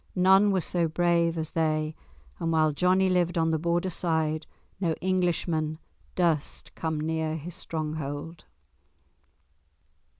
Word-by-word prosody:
None 190 +2 +5
were 190 -2 +2
so 170 0 0
brave 170 0 +1
as 160 -1 -3
they, 155 -1 0 0.5
and 165 - -1
while 155 -1 +3
Johnie 185 +4 +3
lived 175 -2 +1
on 165 0 +2
the 160 - +1
Border 170 +3 0
side 160 -2 0 0.3
no 170 -4 +1
Englishman 170 -4 0 0.4
durst 165 -5 -1
come 160 -2 -2
near 160 0 -1
his 165 +3 -7
stronghold. 155 -1 -5
165 Hz, 125 wpm, -27 LUFS, 155-175 Hz, 0.5 s, None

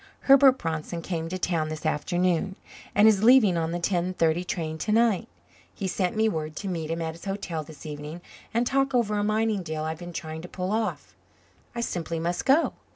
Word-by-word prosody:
Herbert 270 -1 +6
Bronson 165 -1 -4
came 165 -2 -3
to 185 - -3
town 165 -4 -1
this 155 0 -6
afternoon 175 +4 0 0.4
and 210 +1 +7
is 210 -2 +4
leaving 230 -6 +6
on 165 -1 -1
the 175 - -2
10.30 175 -1 0
train 160 -2 -3
to 210 - -2
night. 225 -3 +3 0.5
He's 190 -2 -3
sent 180 0 0
me 220 +1 +3
word 155 -6 -3
to 200 - -5
meet 165 -4 -3
him 165 0 -2
at 160 0 -3
his 170 - -13
hotel 195 -5 -3
this 155 +1 -13
evening 150 +2 -6 0.3
and 235 +2 +1
talk 270 +1 +1
over 220 -4 +2
a - - 0
mining 215 -1 +1
deal 155 -2 -4
I've 160 0 -4
been 175 0 -7
trying 160 -1 -6
to 175 - -8
pull 185 +1 -4
off. 220 0 -2 0.6
I 235 - -2
simply 170 -6 -3
must 175 +2 -2
go. 290 +5 +4
175 Hz, 205 wpm, -26 LUFS, 160-215 Hz, 0.6 s, and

